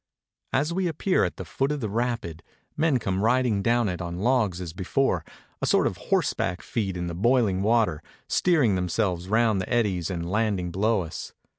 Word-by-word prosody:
As 150 Hz, +5 st, +1 dB
we 185 Hz, 0 st, 0 dB
appear 175 Hz, +4 st, +1 dB
at 90 Hz, -, -2 dB
the 95 Hz, -, -6 dB
foot 135 Hz, -, -1 dB
of 150 Hz, -, -2 dB
the 115 Hz, -, -2 dB
rapid, 115 Hz, -7 st, -2 dB, 0.3 s
men 155 Hz, -3 st, +2 dB
come 95 Hz, -5 st, -2 dB
riding 120 Hz, -3 st, +2 dB
down 120 Hz, +2 st, +2 dB
it 90 Hz, -1 st, -3 dB
on 85 Hz, 0 st, -4 dB
logs 105 Hz, -4 st, +1 dB
as 85 Hz, -3 st, -6 dB
before, 95 Hz, -, 0 dB, 0.4 s
a -, -, 0 dB
sort -, -, +3 dB
of -, -, -1 dB
horseback 90 Hz, +2 st, 0 dB
feat 95 Hz, -6 st, -2 dB
in 90 Hz, -, -3 dB
the 85 Hz, -, -4 dB
boiHng 105 Hz, -1 st, +2 dB
water, 110 Hz, -7 st, +2 dB, 0.3 s
steering 155 Hz, -, +3 dB
themselves 90 Hz, 0 st, -1 dB
round 110 Hz, -2 st, +3 dB
the -, -, -6 dB
eddies 100 Hz, -8 st, +1 dB
and 85 Hz, -2 st, -3 dB
landing 100 Hz, -5 st, 0 dB
below 105 Hz, +3 st, +1 dB
us. 80 Hz, -, -7 dB
105 Hz, 185 wpm, -26 LUFS, 90-120 Hz, 0.4 s, sort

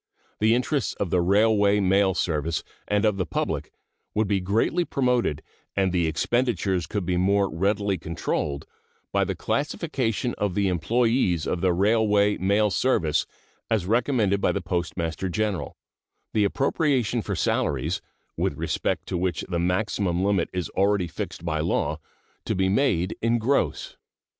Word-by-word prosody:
The 110 Hz, +2 st, +4 dB
interests 130 Hz, +1 st, 0 dB
of 95 Hz, -5 st, -3 dB
the 90 Hz, -, +3 dB
Railway 105 Hz, +2 st, +3 dB
Mail 95 Hz, -1 st, +3 dB
Service 80 Hz, -1 st, -1 dB, 0.2 s
and 105 Hz, +1 st, +1 dB
of 105 Hz, -2 st, +2 dB
the 95 Hz, -, 0 dB
public -, -, -2 dB, 0.4 s
would 110 Hz, 0 st, +2 dB
be 100 Hz, -1 st, +1 dB
greatly 110 Hz, -, +1 dB
promoted 125 Hz, -, 0 dB, 0.3 s
and 95 Hz, -2 st, +2 dB
the 85 Hz, -2 st, +1 dB
expenditures 95 Hz, -2 st, 0 dB
could 100 Hz, -4 st, -3 dB
be 90 Hz, 0 st, 0 dB
more 100 Hz, +2 st, +3 dB
readily 100 Hz, +1 st, 0 dB
controlled 75 Hz, -3 st, -3 dB, 0.5 s
by -, -, +2 dB
the -, -, -2 dB
classification 135 Hz, -, -1 dB
of 100 Hz, -3 st, -1 dB
the 100 Hz, -1 st, +2 dB
employees 95 Hz, -, +1 dB
of 85 Hz, -, -2 dB
the 95 Hz, -, +3 dB
Railway 105 Hz, +2 st, +3 dB
Mail 100 Hz, +3 st, +2 dB
Service 90 Hz, -, +1 dB, 0.4 s
as 110 Hz, -6 st, +1 dB
recommended 110 Hz, -2 st, +1 dB
by -, -, +3 dB
the -, -, -1 dB
Postmaster 85 Hz, -1 st, -2 dB
General, 105 Hz, 0 st, -2 dB, 0.6 s
the 105 Hz, -2 st, +3 dB
appropriation 130 Hz, -, +1 dB
for 100 Hz, -2 st, -3 dB
salaries, 75 Hz, 0 st, 0 dB, 0.3 s
with -, -, -1 dB
respect -, -, -1 dB
to 90 Hz, -, -1 dB
which 90 Hz, 0 st, -1 dB
the 85 Hz, -2 st, -1 dB
maximum 90 Hz, 0 st, 0 dB
limit 100 Hz, -4 st, +1 dB
is 90 Hz, -2 st, -2 dB
already 100 Hz, -2 st, +1 dB
fixed 85 Hz, +1 st, -6 dB
by 80 Hz, -2 st, -1 dB
law, 80 Hz, +3 st, 0 dB, 0.5 s
to -, -, -1 dB
be 95 Hz, 0 st, +1 dB
made 95 Hz, -5 st, +1 dB
in 115 Hz, +1 st, +2 dB
gross. 125 Hz, +5 st, 0 dB
100 Hz, 150 wpm, -25 LUFS, 90-110 Hz, 0.6 s, The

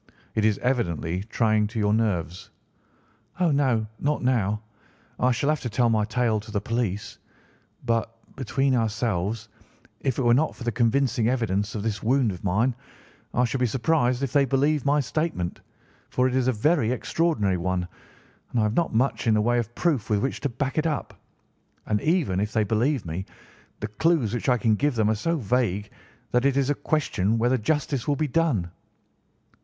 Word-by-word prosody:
It 110 Hz, -, 0 dB
is 110 Hz, -2 st, +3 dB
evidently 90 Hz, -, 0 dB
trying 110 Hz, 0 st, +1 dB
to 110 Hz, -, -8 dB
your 105 Hz, -1 st, +2 dB
nerves." 105 Hz, -2 st, -1 dB, 0.9 s
"Oh, 175 Hz, -3 st, +3 dB
no, 130 Hz, -6 st, +2 dB
not 145 Hz, -1 st, -1 dB
now. 105 Hz, -4 st, +1 dB, 0.6 s
I 125 Hz, -, +3 dB
shall 135 Hz, +4 st, 0 dB
have 155 Hz, -1 st, +1 dB
to 120 Hz, -, -4 dB
tell 115 Hz, +1 st, +2 dB
my 110 Hz, -2 st, +2 dB
tale 115 Hz, -1 st, +1 dB
to 110 Hz, +2 st, -12 dB
the 105 Hz, -1 st, -1 dB
police; 105 Hz, -2 st, -3 dB, 0.7 s
but, 115 Hz, -1 st, 0 dB, 0.2 s
between 135 Hz, +1 st, 0 dB
ourselves, 110 Hz, -2 st, -1 dB, 0.5 s
if 135 Hz, -3 st, -1 dB
it 135 Hz, -, 0 dB
were 120 Hz, -1 st, +5 dB
not 150 Hz, +5 st, +2 dB
for -, -, -9 dB
the 120 Hz, -, 0 dB
convincing 120 Hz, 0 st, +1 dB
evidence 110 Hz, -5 st, -1 dB
of 105 Hz, -, -3 dB
this 105 Hz, -3 st, -2 dB
wound 125 Hz, -1 st, +2 dB
of 90 Hz, -, -9 dB
mine, 105 Hz, +7 st, +2 dB, 0.6 s
I 125 Hz, -, +3 dB
should 125 Hz, +2 st, -2 dB
be 125 Hz, -, +2 dB
surprised 130 Hz, 0 st, +1 dB
if 135 Hz, -, -2 dB
they 145 Hz, -1 st, +5 dB
believed 140 Hz, +2 st, +1 dB
my 145 Hz, +1 st, +4 dB
statement, 140 Hz, -, -2 dB, 0.5 s
for 125 Hz, 0 st, +2 dB
it 130 Hz, -, -2 dB
is 130 Hz, -1 st, +1 dB
a -, -, +4 dB
very 125 Hz, +1 st, +2 dB
extraordinary 125 Hz, -, 0 dB
one, 90 Hz, 0 st, -1 dB, 0.6 s
and 120 Hz, -, -1 dB
I -, -, +3 dB
have 105 Hz, 0 st, +1 dB
not 165 Hz, -3 st, 0 dB
much 125 Hz, +1 st, +1 dB
in 110 Hz, -, +4 dB
the 105 Hz, -, +3 dB
way 120 Hz, +2 st, +2 dB
of 120 Hz, 0 st, -4 dB
proof 150 Hz, -, 0 dB
with 105 Hz, -, +3 dB
which 135 Hz, -, -2 dB
to 140 Hz, -, -1 dB
back 130 Hz, +5 st, -2 dB
it 160 Hz, -, +1 dB
up; 150 Hz, -3 st, -3 dB, 0.7 s
and, 105 Hz, -1 st, 0 dB
even 155 Hz, -, +1 dB
if 105 Hz, +3 st, -2 dB
they 110 Hz, -, +2 dB
believe 115 Hz, +4 st, 0 dB
me, 85 Hz, +3 st, -4 dB, 0.6 s
the 105 Hz, -, -2 dB
clues 125 Hz, 0 st, +1 dB
which 120 Hz, +3 st, -1 dB
I 125 Hz, -, +4 dB
can 115 Hz, -2 st, +2 dB
give 140 Hz, +5 st, +1 dB
them 110 Hz, -1 st, +2 dB
are -, -, +3 dB
so 165 Hz, +11 st, -1 dB
vague 110 Hz, -5 st, 0 dB, 0.4 s
that 125 Hz, +1 st, +2 dB
it 140 Hz, -1 st, +3 dB
is 140 Hz, +1 st, +2 dB
a 145 Hz, -, -5 dB
question 115 Hz, -9 st, +1 dB
whether 120 Hz, +3 st, +2 dB
justice 140 Hz, +1 st, -1 dB
will 145 Hz, -, +2 dB
be 155 Hz, +2 st, 0 dB
done." 130 Hz, -, 0 dB
120 Hz, 190 wpm, -25 LUFS, 105-135 Hz, 0.9 s, were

